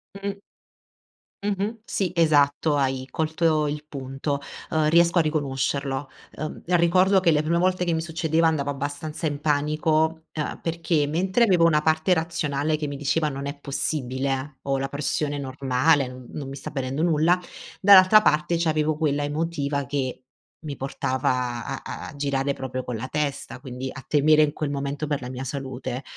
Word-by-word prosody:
Mh-mh. 200 0 -4 1.1
Mh-mh, 205 +2 -2
sì 190 -6 -1
esatto, 150 -2 +3
hai 130 -2 0
colto 160 -1 +1
il 150 +1 -4
punto, 140 0 -4 0.3
ehm, 155 -1 +2
riesco 170 +2 +4
a - - +6
riconoscerlo, 140 -2 -1 0.3
ehm, 155 - -5
ricordo 185 +3 +4
che 175 -2 +3
le 150 0 +2
prime 170 +2 +1
volte 180 0 +1
che 170 - 0
mi 160 - 0
succedeva 165 0 0
andavo 145 -3 +1
abbastanza 145 +3 -4
in 145 -1 -2
panico, 155 +2 +1
emh, 150 -2 -4
perché 165 -2 0
mentre 185 +9 +2
avevo 180 -6 +4
una 150 -2 +3
parte 160 +3 +3
razionale 155 -2 -1
che 150 - -2
mi 140 -1 -5
diceva 150 +2 0
non 140 -1 -5
è 140 +1 -5
possibile, 135 0 -2
ho 135 -1 0
la 135 +1 -2
pressione 145 +1 -2
normale 135 +1 +1
non 125 -1 -10
non 140 -3 -5
mi 135 - -7
sta - - -7
venendo 135 +2 -2
nulla, 170 +2 +3 0.4
dall'altra 200 +2 +8
parte 155 +1 +2
c'avevo 155 -2 +1
quella 145 -2 0
emotiva 145 -2 -1
che 130 -2 -3 0.4
mi 145 -3 -5
portava 125 -2 -1
a - - -5 0.3
a 145 - -11
girare 140 -1 0
proprio 130 -1 -5
con 120 - -4
la 120 +4 -4
testa, 145 -3 -3
quindi 130 -1 -6
a 135 - -9
temere 155 +1 +4
in 150 -1 +1
quel 150 -2 -2
momento 140 +1 -3
per 145 -2 -1
la 125 - -6
mia 130 +1 -5
salute, 130 -1 -5
150 Hz, 165 wpm, -24 LUFS, 140-160 Hz, 1.1 s, dall'altra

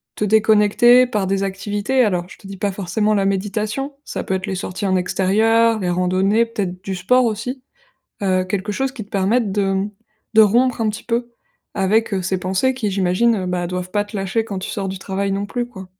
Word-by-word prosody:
te 210 - -1
déconnecter 220 +4 +5
par 210 -6 -1
des 195 +1 0
activités. 205 +6 0
Alors, 180 -5 0
je - - -13
te 195 - -13
dis 195 -1 -8
pas 200 +1 -1
forcément 205 +3 0
la 200 -2 +1
méditation, 210 +8 -2
ça - - -5
peut 190 - -2
être 190 +2 -2
les 190 - -2
sorties 190 +2 -4
en 185 - +2
extérieur, 220 +5 +2
les 180 - -1
randonnées, 185 +5 +2
peut-être 185 -5 -4
du 190 -1 -3
sport 250 +8 +3
aussi, 235 +4 -3 0.6
heu, 185 -1 +2
quelque 200 +2 -3
chose 270 +4 -1
qui 225 -6 -7
te 205 - -27
permette 200 +2 +1
de, 205 - 0
hem, 195 +1 0 0.4
de 220 - +7
rompre 240 +4 +3
un 220 - +1
petit 210 - -8
peu 240 0 -2 0.4
avec, 215 +3 +1
heu, 190 - -1
ces 190 +1 -1
pensées 190 +9 0
qui, 220 -5 -2
j'imagine, 195 +4 +2
heu, 185 -2 -3
bah, 180 -1 -1
doivent 180 0 -4
pas 205 - +2
te 205 0 -8
lâcher 195 +4 -1
quand 200 -4 -5
tu - - -5
sors 195 -2 -3
du 190 0 -5
travail 195 0 -2
non 200 +1 -2
plus, 240 +2 -3
quoi. 190 -6 -10
200 Hz, 220 wpm, -20 LUFS, 190-225 Hz, 0.6 s, de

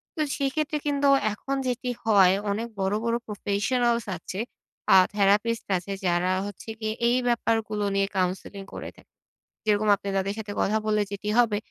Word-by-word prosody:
তো, 315 - -2 0.2
সেক্ষেত্রে 300 +2 -1
কিন্তু 285 -1 +2 0.3
এখন 270 +6 -4
যেটি 250 0 -2 0.2
হয়, 195 -4 +6 0.2
অনেক 220 +3 -2
বড়ো 195 +2 +1
বড়ো 235 0 +1
প্রফেশনালস 235 +3 0
আছে, 185 +3 -7 0.5
আ - - +9 0.2
থেরাপিস্ট 210 +3 +2
আছে, 180 +3 -7
যারা 175 +1 +2
হচ্ছে 205 +2 -8
গিয়ে 215 -1 -2 0.2
এই 245 - +3
ব্যাপারগুলো 225 -3 0
নিয়ে 195 0 +2
কাউন্সেলিং 190 +2 -2
করে - - -6
থাকে। - - -21 0.5
যেরকম 210 0 +2
আপনি 200 0 -6
তাদের 195 +1 -1
সাথে 210 -1 -5
কথা 215 +2 +2
বললে 210 0 +2
যেটি 200 +1 -4
হবে, 225 -4 +3
210 Hz, 160 wpm, -26 LUFS, 200-235 Hz, 0.5 s, আ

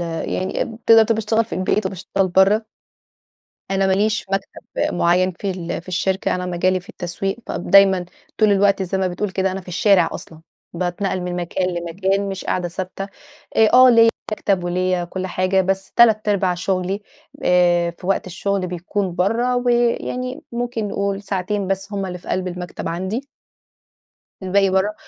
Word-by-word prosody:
يعني 175 +2 -2
اب 225 -1 -7
تقدَر 225 -1 +8
تقول 225 +1 +1
باشتغل 220 +1 +1
في - - -7
البيت 190 +2 0
وباشتغل 190 +1 -1
برَّه. 195 +4 +4 1.1
أنا 195 0 +2
ما 190 - +2
ليش 215 +3 +1
مكتب 195 0 -3
مُعيّن 180 +2 +2
في 195 +3 -4
ال 175 -3 -4
في 180 - -22
الشركة، 190 +1 0
أنا 180 0 -3
مجالي 185 +1 +1
في 180 - -22
التسويق، 190 +3 -4
فدايمًا 195 -2 +4 0.3
طول 215 -2 +4
الوقت 200 0 +3
زي 190 +1 -2
ما 190 -1 +1
بتقول 185 +3 -3
كده، 190 0 0
أنا 195 - -4
في 180 - -17
الشارع 195 +2 +3
أصلًا، 160 -1 -9 0.3
باتنقَّل 180 +2 -2
من 180 0 -4
مكان 180 +1 -1
لمكان، 190 +4 -1
مش 190 -1 -5
قاعدة 180 -1 -1
ثابتة، 185 +2 -5 0.5
أ 220 -1 +6
آه، 255 0 +8
ليّا 230 -1 +6 0.2
مكتب 195 -4 0
وليّا 180 0 0
كُل 185 +2 -5
حاجة، 185 +1 +1
بس 190 +1 -2
تلات 220 -3 +4
أرباع 190 -3 +2
شُغلي 185 +2 -2 0.4
آآ، 175 -1 +3
في 180 +2 -12
وقت 195 - 0
الشغل 190 +1 -2
بيكُون 180 +1 -3
برّه، 230 +7 +1
ويعني 245 +1 0
ممكن 235 -3 -2
نقول 200 0 -2
ساعتين 200 +1 -2
بس 195 +2 -3
هُم 195 -1 -2
اللي 180 -1 -6
في - - -14
قلْب 185 0 -1
المكتب 180 -1 -6
عندي. 190 +11 -3 1.2
الباقي 195 +1 +2
برَّه. 190 +3 +1
190 Hz, 165 wpm, -20 LUFS, 180-205 Hz, 1.2 s, تقدَر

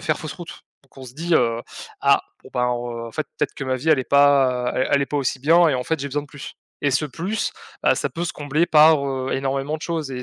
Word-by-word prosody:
faire - - -1
fausse - - -6
route. - - -10 0.2
Donc - - -29
on 130 - -9
se 125 -1 -11
dit, 170 +3 -1
heu: 115 -4 +2 0.4
«Ah! - - +4 0.2
Bon, - - -15
bah, 125 - 0
heu, 120 -1 -3
en 115 - -10
fait, 155 - -3
peut-être - - -1
que 140 - -6
ma 130 0 -1
vie 145 +5 -4
elle 155 - +5
est 130 - -2
pas 135 -3 +4
elle 130 - 0
elle 140 0 +4
est 140 - -2
pas 150 - -3
aussi 130 -1 -1
bien 165 +5 +5
et 140 - +1
en 125 - -1
fait, 160 +1 -2
j'ai 140 - -3
besoin 145 +2 -2
de - - -13
plus.» 145 -1 -10 0.3
Et 145 -1 +1
ce 145 +4 +1
plus, 175 - -3 0.3
heu, - - +5
ça - - -1
peut 170 0 -4
se - - -3
combler 145 +3 0
par, 155 -2 +5
heu, 130 -1 -3
énormément 135 +2 -2
de 155 - -13
choses 160 -5 -3
et 125 - -5
140 Hz, 280 wpm, -22 LUFS, 130-155 Hz, 0.4 s, elle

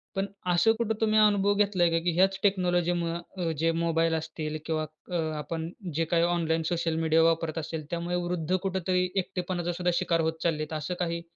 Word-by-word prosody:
पण 195 0 0 0.3
असं 225 +6 +4
कुठं 225 -1 0
तुम्ही 215 -1 +4
अनुभव 205 -1 +4
घेतलाय 200 -4 +3
का? 165 - +2
की 175 - +2
ह्याच 190 +2 +3
टेक्नॉलॉजीमुळं 175 -3 +1 0.2
अं, 170 -2 -1
जे 165 +1 +2
मोबाईल 165 0 +1
असतील 155 -1 -4
किंवा 155 -1 -1 0.3
अ, 175 - 0 0.2
आपण 160 +2 -4 0.3
जे 165 - +1
काही 170 0 +4
ऑनलाईन 165 -2 +1
सोशल 165 -1 0
मीडिया 160 0 +3
वापरत 165 -1 +1
असेल 160 -1 -5
त्यामुळे 170 +1 -2
वृद्ध 175 0 -1
कुठेतरी 185 -1 0
एकटेपणाचा 175 -1 -2
सुद्धा 180 +1 0
शिकार 170 -2 +1
होत 160 0 -2
चाललेत 155 -2 -1
असं 155 +3 -3
काही? 170 -1 -1
170 Hz, 180 wpm, -28 LUFS, 165-180 Hz, 0.3 s, असं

